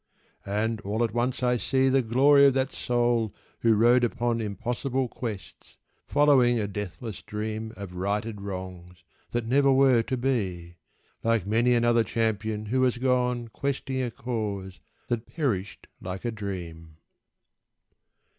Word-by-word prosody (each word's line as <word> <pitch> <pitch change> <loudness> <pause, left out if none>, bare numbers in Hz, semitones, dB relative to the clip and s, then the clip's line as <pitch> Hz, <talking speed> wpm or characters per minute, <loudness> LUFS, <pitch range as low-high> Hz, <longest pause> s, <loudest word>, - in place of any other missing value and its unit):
And 105 +2 -1
all 105 +4 -1
at 115 - -1
once 125 +2 -1
I 125 0 +3
see 130 +2 +1
The 135 0 +4
glory 140 +4 +5
of 135 - +2
that 135 0 0
soul 120 -3 0 0.2
who 115 -1 +4
rode 120 +3 +5
upon 120 0 0
Impossible 125 +5 -2
quests, 115 -5 -8 0.3
following 135 -5 +4
a 105 - -1
deathless 105 +2 -6
dream 110 +1 -4
Of 100 -3 -7
righted 100 +3 -2
wrongs, 90 -3 -7 0.3
that 120 -1 -2
never 135 +3 +3
were 130 -3 +5
to 130 +3 -3
be, 95 -10 -2 0.5
Like 115 -4 +1
many 115 +4 +3
another 120 -1 +3
champion 110 -1 -1
who 130 +5 0
has 125 -1 +2
gone 125 -2 0
Questing 135 +1 -2
a 125 - -1
cause 105 -6 -4 0.3
that 120 -1 -2
perished 105 - -3 0.2
like 95 +4 -6
a 120 - 0
dream. 85 -7 -7
115 Hz, 140 wpm, -27 LUFS, 105-125 Hz, 0.5 s, glory